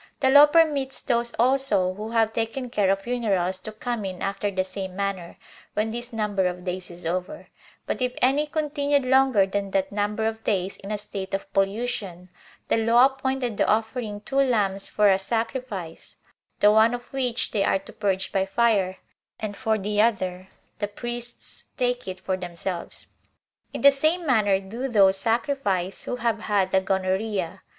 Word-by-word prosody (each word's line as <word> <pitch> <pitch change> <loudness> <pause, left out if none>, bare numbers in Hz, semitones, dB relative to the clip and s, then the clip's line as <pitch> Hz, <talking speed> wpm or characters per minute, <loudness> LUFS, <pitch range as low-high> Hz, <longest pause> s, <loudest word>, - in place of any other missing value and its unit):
The 265 -2 +3
law 285 +2 +9
permits 295 -4 +2
those 235 0 0
also 250 -7 +2
who 210 +3 -6
have 225 -1 +1
taken 235 +3 -3
care 205 -5 +2
of 195 0 +1
funerals 195 -7 0
to 215 - -8
come 230 +1 -4
in 185 -2 -5
after 200 +1 -1
the 190 -1 -1
same 185 0 -6
manner, 195 -3 -3 0.4
when 215 +1 0
this 240 +2 -4
number 205 -4 0
of 180 0 -5
days 180 0 -4
is 175 -1 -11
over; 185 - -4 0.4
but - - -3
if 250 0 +1
any 275 +4 +2
continued 290 -2 0
longer 260 -6 +4
than 200 +1 -3
that 190 0 0
number 210 +2 -1
of 225 0 -3
days 195 -2 -1
in 195 - -10
a 210 - -1
state 195 -1 -5
of 195 - -7
pollution, 195 -3 -2 0.4
the - - +2
law 230 +3 +5
appointed 265 -4 -1
the - - +2
offering 220 -1 -1
two 270 +5 -4
lambs 205 -7 +1
for 210 0 +3
a 190 -1 +4
sacrifice; 225 -4 -4 0.5
the 205 - +7
one 220 +2 +5
of 245 +2 -11
which 250 -3 -1
they 205 -3 +1
are - - +2
to 195 - -12
purge 195 -2 -1
by 195 - +1
fire, 195 -2 +1 0.4
and 210 -2 -4
for 220 -1 0
the 210 +1 0
other, 185 -5 0 0.3
the 205 - -1
priests 240 +3 -7
take 245 -3 -1
it 185 0 -5
for 185 0 -2
themselves. 175 0 -6 0.7
In - - -5
the 280 - +8
same 315 +5 +1
manner 210 -8 +3
do 225 +7 -5
those 195 -5 +4
sacrifice 225 -5 -1
who - - -2
have 230 -2 -1
had 200 -3 0
the 190 - +3
gonorrhea. 190 -1 -1
210 Hz, 175 wpm, -25 LUFS, 190-245 Hz, 0.7 s, law